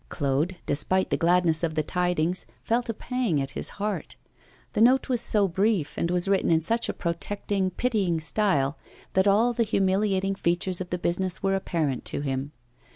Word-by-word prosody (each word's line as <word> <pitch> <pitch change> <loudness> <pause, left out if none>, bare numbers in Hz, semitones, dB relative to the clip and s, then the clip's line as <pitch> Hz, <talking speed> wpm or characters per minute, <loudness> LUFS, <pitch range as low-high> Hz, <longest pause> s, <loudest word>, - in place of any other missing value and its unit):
Claude, 145 +5 -1
despite 185 +6 0
the - - +3
gladness 170 -2 +2
of 165 -2 -1
the 155 - +1
tidings, 180 +1 -1 0.2
felt 235 +1 0
a - - 0
pang 240 - -1
at 135 0 -3
his - - -5
heart; 210 0 -3 0.6
the 210 - 0
note 255 +4 +4
was 245 -3 +1
so 205 -2 +2
brief, 190 -3 0
and 170 - -1
was 180 +1 +1
written 195 -1 +2
in 165 -1 +4
such 230 +9 0
a - - -1
protecting, 190 +3 -1
pitying 195 -5 0
style, 160 -5 +1 0.3
that 190 +1 +3
all 220 +5 +4
the 235 - -1
humiliating 195 -2 +1
features 180 0 -1
of 180 - -5
the 180 - -1
business 180 +2 -1
were 195 0 +2
apparent 165 -8 -1
to - - -3
him. 135 0 -3
185 Hz, 180 wpm, -26 LUFS, 165-205 Hz, 0.6 s, note